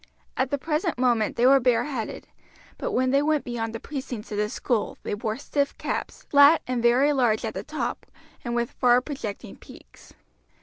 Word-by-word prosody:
At 260 Hz, -, 0 dB
the 285 Hz, -, 0 dB
present 310 Hz, +2 st, -1 dB
moment 240 Hz, -4 st, +1 dB
they 240 Hz, -, +2 dB
were 270 Hz, +1 st, +7 dB
bareheaded; 245 Hz, -1 st, -1 dB, 0.5 s
but -, -, -3 dB
when 255 Hz, +1 st, +2 dB
they 275 Hz, +1 st, +3 dB
went 305 Hz, 0 st, +1 dB
beyond 230 Hz, -2 st, -3 dB
the 225 Hz, -, -6 dB
precincts 255 Hz, -6 st, -7 dB
of 205 Hz, -, -2 dB
the 210 Hz, 0 st, 0 dB
school 230 Hz, -1 st, -2 dB
they -, -, -3 dB
wore 215 Hz, +1 st, -3 dB
stiff 280 Hz, 0 st, -2 dB
caps, -, -, -4 dB
flat 285 Hz, +2 st, +6 dB
and 250 Hz, -2 st, -2 dB
very 255 Hz, +5 st, +4 dB
large 240 Hz, -5 st, +1 dB
at -, -, -3 dB
the -, -, -4 dB
top, -, -, -4 dB, 0.4 s
and 240 Hz, -1 st, -3 dB
with 235 Hz, -1 st, -1 dB
far 245 Hz, 0 st, +4 dB
projecting 250 Hz, -7 st, -7 dB
peaks. -, -, -16 dB
250 Hz, 185 wpm, -25 LUFS, 230-280 Hz, 0.5 s, were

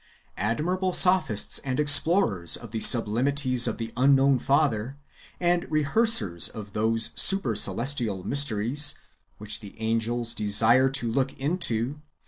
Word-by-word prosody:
Admirable 180 Hz, -, -2 dB
sophists, 180 Hz, -, +2 dB
and 130 Hz, 0 st, -5 dB
explorers 145 Hz, -, +3 dB
of 115 Hz, -3 st, -12 dB
the 110 Hz, -, -5 dB
sublimities 125 Hz, +3 st, +3 dB
of 115 Hz, -, -4 dB
the 115 Hz, -1 st, -7 dB
unknown 135 Hz, +1 st, +2 dB
Father, 135 Hz, -3 st, -1 dB, 0.4 s
and 175 Hz, 0 st, -1 dB
rehearsers 150 Hz, -, 0 dB
of 105 Hz, -2 st, -11 dB
those 110 Hz, +1 st, 0 dB
super 185 Hz, -, +1 dB
celestial 105 Hz, -1 st, -2 dB
mysteries 140 Hz, +2 st, 0 dB, 0.4 s
"which 105 Hz, 0 st, -1 dB
the 105 Hz, -1 st, -14 dB
angels 115 Hz, +1 st, -3 dB
desire 115 Hz, +5 st, +2 dB
to 125 Hz, -4 st, -3 dB
look 135 Hz, +2 st, -2 dB
into!" 140 Hz, -3 st, -3 dB
125 Hz, 120 wpm, -24 LUFS, 110-145 Hz, 0.4 s, explorers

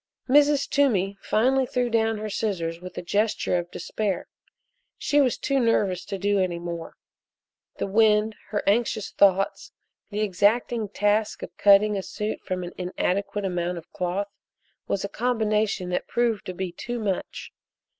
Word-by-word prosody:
Mrs. 285 Hz, +1 st, +4 dB
Toomey 200 Hz, -9 st, +2 dB
finally 260 Hz, +4 st, +2 dB
threw 250 Hz, 0 st, 0 dB
down 225 Hz, -1 st, +1 dB
her 215 Hz, +1 st, -4 dB
scissors 180 Hz, -6 st, -2 dB
with 180 Hz, 0 st, -9 dB
a -, -, -4 dB
gesture 205 Hz, -1 st, +1 dB
of 175 Hz, 0 st, -6 dB
despair. 200 Hz, -2 st, -3 dB, 0.7 s
She 290 Hz, 0 st, +2 dB
was 255 Hz, -4 st, +2 dB
too 275 Hz, -1 st, 0 dB
nervous 200 Hz, -6 st, +1 dB
to 195 Hz, -, -4 dB
do 200 Hz, +1 st, +1 dB
any 180 Hz, -2 st, 0 dB
more. 170 Hz, -1 st, -6 dB, 0.8 s
The -, -, -1 dB
wind, 215 Hz, +1 st, +3 dB
her 210 Hz, -, -1 dB
anxious 215 Hz, 0 st, +1 dB
thoughts, 195 Hz, -1 st, +2 dB, 0.4 s
the 210 Hz, 0 st, -3 dB
exacting 215 Hz, +3 st, +1 dB
task 210 Hz, +1 st, 0 dB
of -, -, -8 dB
cutting 205 Hz, +1 st, +5 dB
a -, -, -1 dB
suit 210 Hz, +3 st, -4 dB
from 185 Hz, -1 st, -3 dB
an 175 Hz, -, -7 dB
inadequate 195 Hz, +3 st, -1 dB
amount 175 Hz, -1 st, -1 dB
of 170 Hz, -, -11 dB
cloth, 190 Hz, +3 st, -2 dB, 0.6 s
was 200 Hz, -, -1 dB
a -, -, -2 dB
combination 215 Hz, -5 st, 0 dB
that 180 Hz, -, -2 dB
proved 235 Hz, -3 st, 0 dB
to 185 Hz, -, -5 dB
be 185 Hz, -1 st, -3 dB
too 240 Hz, +7 st, -5 dB
much. 205 Hz, -5 st, -4 dB
205 Hz, 155 wpm, -25 LUFS, 185-225 Hz, 0.8 s, cutting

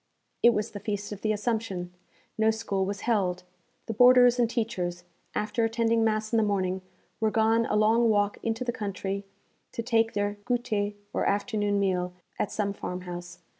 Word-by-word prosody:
It 235 Hz, 0 st, +6 dB
was 210 Hz, +1 st, -1 dB
the 205 Hz, -, -6 dB
Feast 205 Hz, 0 st, -4 dB
of 205 Hz, -, -7 dB
the 215 Hz, -, +1 dB
Assumption; 210 Hz, -5 st, -2 dB, 0.4 s
no 220 Hz, 0 st, +3 dB
school 210 Hz, -3 st, -1 dB
was 200 Hz, 0 st, -4 dB
held. 190 Hz, -6 st, 0 dB, 0.4 s
The 225 Hz, -, -3 dB
boarders 245 Hz, +1 st, +6 dB
and 235 Hz, -2 st, +3 dB
teachers, 180 Hz, -7 st, -2 dB, 0.3 s
after 215 Hz, +2 st, 0 dB
attending 225 Hz, 0 st, +2 dB
mass 215 Hz, 0 st, 0 dB
in -, -, +4 dB
the -, -, +4 dB
morning, 190 Hz, -2 st, 0 dB, 0.4 s
were 220 Hz, -1 st, +2 dB
gone 225 Hz, +1 st, +2 dB
a -, -, 0 dB
long 225 Hz, +2 st, +4 dB
walk 205 Hz, -1 st, +1 dB
into 225 Hz, +2 st, -1 dB
the 245 Hz, -, -1 dB
country 200 Hz, -2 st, -4 dB, 0.5 s
to 230 Hz, -, -3 dB
take 225 Hz, -1 st, +2 dB
their 205 Hz, 0 st, -1 dB
goûter, 225 Hz, -4 st, -1 dB, 0.2 s
or -, -, 0 dB
afternoon 205 Hz, 0 st, +1 dB
meal, 180 Hz, -2 st, 0 dB, 0.3 s
at 205 Hz, -, -1 dB
some 200 Hz, -2 st, -1 dB
farmhouse. 175 Hz, -2 st, -6 dB
215 Hz, 170 wpm, -28 LUFS, 200-225 Hz, 0.5 s, It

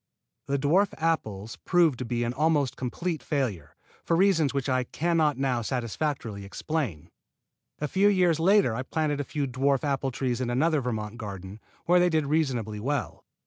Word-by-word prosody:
The 140 Hz, -, +1 dB
dwarf 165 Hz, +9 st, +2 dB
apples 115 Hz, -11 st, -2 dB
proved 170 Hz, -8 st, +2 dB
to 125 Hz, -, -3 dB
be 120 Hz, +1 st, -1 dB
an 120 Hz, +1 st, -1 dB
almost 150 Hz, -2 st, +1 dB
complete 160 Hz, +6 st, -3 dB
failure, 110 Hz, -, -2 dB, 0.3 s
for 165 Hz, -, +1 dB
reasons 165 Hz, -6 st, +3 dB
which 140 Hz, -1 st, -2 dB
I 130 Hz, -1 st, +1 dB
can 170 Hz, +6 st, -1 dB
not 150 Hz, -4 st, +2 dB
now 130 Hz, -3 st, 0 dB
satisfactorily 120 Hz, -2 st, -3 dB
explain. 105 Hz, -, -4 dB, 0.7 s
A 150 Hz, -, -2 dB
few 190 Hz, +7 st, +3 dB
years 180 Hz, -5 st, +3 dB
later 190 Hz, -, +4 dB
I 120 Hz, -, -2 dB
planted 150 Hz, +2 st, -1 dB
a -, -, 0 dB
few 145 Hz, +1 st, -2 dB
dwarf 135 Hz, +1 st, +1 dB
apple 140 Hz, -2 st, 0 dB
trees 125 Hz, -1 st, -2 dB
in 125 Hz, -, -1 dB
another 150 Hz, +5 st, +2 dB
Vermont 110 Hz, -3 st, -4 dB
garden, 100 Hz, -2 st, -7 dB, 0.3 s
where 180 Hz, +1 st, +5 dB
they 180 Hz, 0 st, +4 dB
did 160 Hz, -3 st, +1 dB
reasonably 130 Hz, -8 st, 0 dB
well. 130 Hz, -, -3 dB
140 Hz, 175 wpm, -27 LUFS, 120-160 Hz, 0.7 s, where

